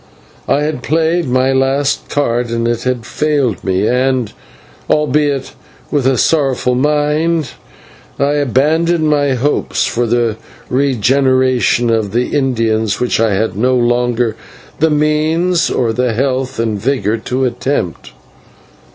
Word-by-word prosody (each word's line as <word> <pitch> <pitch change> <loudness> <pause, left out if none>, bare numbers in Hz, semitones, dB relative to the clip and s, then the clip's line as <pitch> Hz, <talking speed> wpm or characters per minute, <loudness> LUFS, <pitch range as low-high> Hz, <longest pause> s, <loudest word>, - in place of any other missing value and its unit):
I 140 - +2
had 150 -4 -2
played 160 +1 0
my 130 +1 +2
last 135 +1 0
card 120 -4 0
and 115 0 -1
it 120 -1 -1
had 125 -3 -1
failed 145 -8 -1
me, 95 +2 0
and, 125 -2 0 0.6
albeit 145 -2 0 0.4
with 140 -4 +1
a 135 -1 +2
sorrowful 135 -3 +1
mind, 150 +3 +1 0.7
I 140 +1 +1
abandoned 155 +4 +1
my 145 -3 +2
hopes 140 +4 0
for 120 0 -1
the 115 -2 0 0.3
regeneration 130 -1 +2
of 110 -3 -1
the 125 +5 -1
Indians 115 -6 0
which 125 -2 0
I 110 -3 +2
had 110 +3 -1
no 125 +5 +1
longer 120 -1 +1 0.4
the 160 - +3
means 155 +3 +1
or 115 -3 0
the 125 0 0
health 130 +1 -1
and 110 -3 -2
vigour 115 -4 0
to 125 +4 -2
attempt. 125 - -3
130 Hz, 130 wpm, -15 LUFS, 120-145 Hz, 0.7 s, the